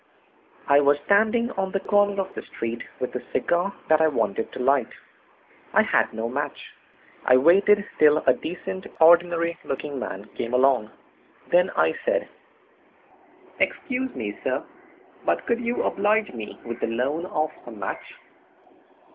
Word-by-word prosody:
I 140 0 +6
was 145 0 +4
standing 220 +4 +3
on 190 -3 -3
the 195 - +1
corner 205 0 +2
of 190 0 -3
the - - -6
street 115 +1 -5 0.2
with 125 - -3
a 125 - -3
cigar 175 +3 0 0.2
that 155 0 +4
I 160 - +5
wanted 115 -7 -1
to - - -7
light. 135 -1 +2 0.9
I - - +5
had - - +1
no 110 +1 -3
match. 140 +3 -5 0.5
I 125 - +5
waited 195 +8 +5
till 150 0 +6
a 130 - +6
decent, 185 +5 -6
ordinary 170 +1 +4
looking 140 0 -4
man 100 -5 -6
came 120 +2 -2
along. 125 -4 +3 0.6
Then 180 +2 +4
I - - +3
said: - - 0 1.3
"Excuse 260 0 -1
me, 105 -4 -4
sir, 130 +1 -1 0.6
but - - 0
could 235 0 0
you 235 0 -1
oblige 210 -1 +1
me 110 -3 -8
with 120 0 -6
the - - -1
loan 135 +9 -2
of 155 -3 -1 0.2
a - - -7
match?" 110 - -6
155 Hz, 150 wpm, -24 LUFS, 125-195 Hz, 1.3 s, I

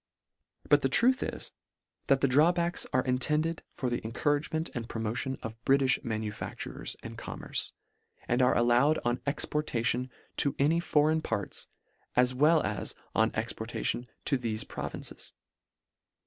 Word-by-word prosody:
But - - +5
the - - +1
truth 255 +2 +4
is, - - -4 0.6
that 135 -1 +4
the 140 - +4
draw 150 +6 +5
backs 175 0 -1
are 130 - +2
intended 150 +6 +1
for 130 - -2
the 120 0 -2
encourage 145 +6 0
ment 160 +1 -1
and 120 -1 -5
promotion 115 +4 -2
of 115 +1 -7
Britilh 135 -1 +3
manufactures 110 -3 -4
and - - -7
commerce, - - -3 0.5
and 120 +2 +2
are 125 - +4
allowed 120 +6 +4
on 120 +1 +2
exporta 140 -4 -1
tion 125 +1 +1 0.3
to 140 - +2
any 155 +5 +3
foreign 155 -1 +3
parts, 110 -8 -3 0.5
as 125 0 +4
well 155 +5 +4
as 105 -2 -2 0.2
on 110 0 +3
ex 115 +2 -2
portation 120 +2 -2 0.2
to 135 -3 +2
thefe 110 -3 -3
provinces. - - -6
130 Hz, 150 wpm, -30 LUFS, 120-150 Hz, 0.6 s, But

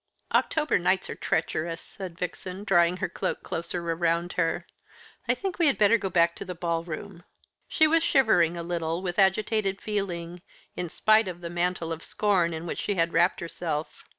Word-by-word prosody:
"October 305 - +2
nights 185 +2 +1
are - - -5
treacherous," 165 +1 -1
said 185 -4 -9
Vixen, 180 +2 -5
drawing 175 -3 +3
her - - -1
cloak - - -3
closer 170 +1 -4
around 170 +1 0
her. 165 -2 0 0.6
"I - - +3
think 385 -3 -4
we 335 - +4
had 280 - +2
better 215 +2 +5
go 195 - -2
back 170 -1 +3
to - - -5
the 180 -1 -6
ball 170 -1 -1
room." 175 +2 -7 0.4
She 315 - +4
was 325 +1 +4
shivering 220 - +3
a 170 - -4
little 170 0 -2
with 180 +1 -2
agitated 195 0 +2
feeling, 180 -5 -4 0.3
in 175 -1 -3
spite 215 +4 +4
of 175 -2 -5
that 170 -1 -6
mantle 175 -1 -1
of 165 0 -4
scorn 190 -5 +1
in 160 +1 -5
which 170 - -4
she 205 - -1
had 165 -1 +1
wrapped 175 +2 +3
herself. 165 -2 -4
175 Hz, 185 wpm, -27 LUFS, 170-200 Hz, 0.6 s, better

